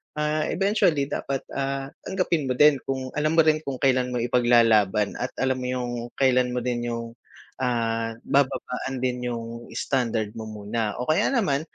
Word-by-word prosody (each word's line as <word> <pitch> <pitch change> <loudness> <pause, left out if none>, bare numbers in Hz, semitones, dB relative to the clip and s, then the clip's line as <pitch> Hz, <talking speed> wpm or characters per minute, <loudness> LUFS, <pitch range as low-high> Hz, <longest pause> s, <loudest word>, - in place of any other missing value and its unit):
ah, 150 0 0
eventually 195 -7 +2
dapat, 135 -1 -2
ah, 135 0 -3 0.2
tanggapin 175 -6 0
mo 125 - 0
din 145 0 +6
kung 130 -1 -3
alam 155 +2 +1
mo 165 - +6
rin 155 0 +3
kung 135 - -2
kailan 130 -2 +3
mo 120 - 0
ipaglalaban 115 -4 +3
at 125 - -4
alam 130 0 0
mo 125 - -3
yung 125 -1 -2 0.2
kailan 125 -2 +2
mo 125 - -1
din 120 -1 -2
yung, 115 0 -4 0.5
ah, 115 -2 -1
bababaan 135 -1 0
din 125 -1 -1
yung 115 0 -6
standard 115 -5 -1
mo 110 -1 -7
muna 105 0 -3
o 125 - -3
kaya 155 - +3
naman, 195 - +1
125 Hz, 170 wpm, -25 LUFS, 115-140 Hz, 0.5 s, din